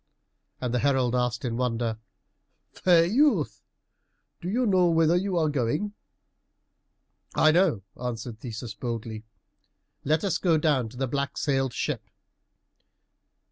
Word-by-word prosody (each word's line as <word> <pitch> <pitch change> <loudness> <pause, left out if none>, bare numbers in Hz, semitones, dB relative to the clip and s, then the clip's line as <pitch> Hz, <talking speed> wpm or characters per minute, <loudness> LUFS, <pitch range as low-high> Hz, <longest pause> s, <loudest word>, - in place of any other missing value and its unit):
And 125 -2 -2
the 125 - +2
herald 130 -3 +2
asked 125 -1 0
in 115 -1 -2
wonder, 115 -3 -1 0.7
"Fair 170 -2 +4
youth, 275 - +2 0.8
do 175 - -4
you 245 +5 +1
know 185 -4 +4
whither 165 0 +3
you 185 0 0
are 160 -2 +2
going?" 150 - -1 1.4
"I 155 - +5
know," 165 - +2
answered 120 -2 -5
Theseus 115 -2 -6
boldly; 115 -2 -5 0.8
"let 155 +2 +1
us 195 -4 0
go 170 -4 +3
down 145 -7 +1
to 125 - -13
the 135 +1 -1
black 140 +2 -2
sailed 135 -4 0
ship." - - -3
135 Hz, 130 wpm, -26 LUFS, 120-170 Hz, 1.4 s, I